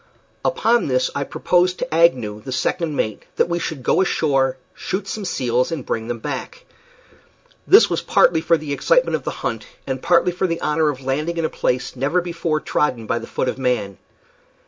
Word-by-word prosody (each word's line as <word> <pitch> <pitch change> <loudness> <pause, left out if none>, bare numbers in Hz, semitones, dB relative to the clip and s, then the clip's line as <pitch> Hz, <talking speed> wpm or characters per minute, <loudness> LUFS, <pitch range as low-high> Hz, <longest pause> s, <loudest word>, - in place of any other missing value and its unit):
Upon 475 - +2
this 130 -1 +1
I 140 - -1
proposed 180 +5 +1
to 255 - -4
Agnew, 125 -11 +2
the 130 - -7
second 150 +5 -1
mate, 110 -6 -2
that - - +2
we 170 0 -1
should 160 -5 -4
go 170 - +3
ashore, 135 -7 +1 0.2
shoot 195 +1 -4
some 210 0 -4
seals, 125 -5 0
and 155 -6 -4
bring 110 0 -3
them 120 0 -3
back. - - -6 1.0
This 415 +4 +7
was - - -1
partly 160 -2 +3
for 165 +1 +3
the 150 -2 -5
excitement - - +2
of - - -5
the - - -1 0.2
hunt, - - -3 0.2
and - - -3
partly 180 - +3
for 185 +2 -1
the 165 -1 -2
honor 150 0 +1
of 135 -2 -4
landing 155 +6 -1
in 165 - 0
a - - 0
place 125 +1 -2
never 140 +7 +1
before 170 -3 -2
trodden 125 -7 -1
by 115 +2 -1
the 115 - -9
foot - - -2
of 130 - -2
man. 120 -7 -1
150 Hz, 195 wpm, -21 LUFS, 130-175 Hz, 1.0 s, This